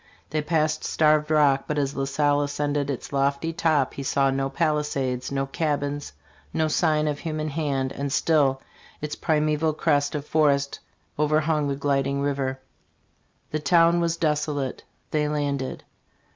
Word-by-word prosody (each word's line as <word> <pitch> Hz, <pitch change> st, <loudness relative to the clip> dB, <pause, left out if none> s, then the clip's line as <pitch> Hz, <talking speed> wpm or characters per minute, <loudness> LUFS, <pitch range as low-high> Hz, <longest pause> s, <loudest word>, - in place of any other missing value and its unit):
' -, -, -28 dB
' -, -, -38 dB
They 155 Hz, +1 st, 0 dB
passed 155 Hz, -1 st, 0 dB
Starved 155 Hz, -1 st, +2 dB
Rock, 145 Hz, -3 st, +3 dB
but 150 Hz, -, -2 dB
as 140 Hz, -1 st, -1 dB
La 135 Hz, -, -1 dB
Salle 145 Hz, +1 st, +2 dB
ascended 145 Hz, 0 st, -1 dB
its 140 Hz, 0 st, -5 dB
lofty 140 Hz, +4 st, 0 dB
top 155 Hz, -6 st, +1 dB
he -, -, -6 dB
saw 135 Hz, 0 st, +2 dB
no 135 Hz, 0 st, -1 dB
palisades, 140 Hz, -5 st, -1 dB
no 135 Hz, 0 st, 0 dB
cabins, 145 Hz, 0 st, -2 dB, 0.4 s
no 160 Hz, -, +1 dB
sign 155 Hz, -1 st, +2 dB
of 145 Hz, -1 st, -2 dB
human 155 Hz, -2 st, -3 dB
hand, 140 Hz, -3 st, -1 dB
and 140 Hz, 0 st, -4 dB
still 140 Hz, -3 st, +2 dB, 0.4 s
its 150 Hz, 0 st, -4 dB
primeval 155 Hz, 0 st, +1 dB
crest 145 Hz, -2 st, +1 dB
of 145 Hz, -1 st, -3 dB
forest 140 Hz, -3 st, +1 dB, 0.4 s
overhung 150 Hz, 0 st, +2 dB
the 140 Hz, -, -1 dB
gliding 140 Hz, 0 st, 0 dB
river, 140 Hz, -1 st, 0 dB
"f 130 Hz, -, -6 dB, 0.9 s
The 155 Hz, -, -1 dB
town 170 Hz, +3 st, +4 dB
was 170 Hz, -1 st, 0 dB
desolate. 150 Hz, -4 st, -1 dB, 0.3 s
They 150 Hz, -1 st, +1 dB
landed. 140 Hz, -3 st, -2 dB
145 Hz, 160 wpm, -25 LUFS, 140-155 Hz, 0.9 s, town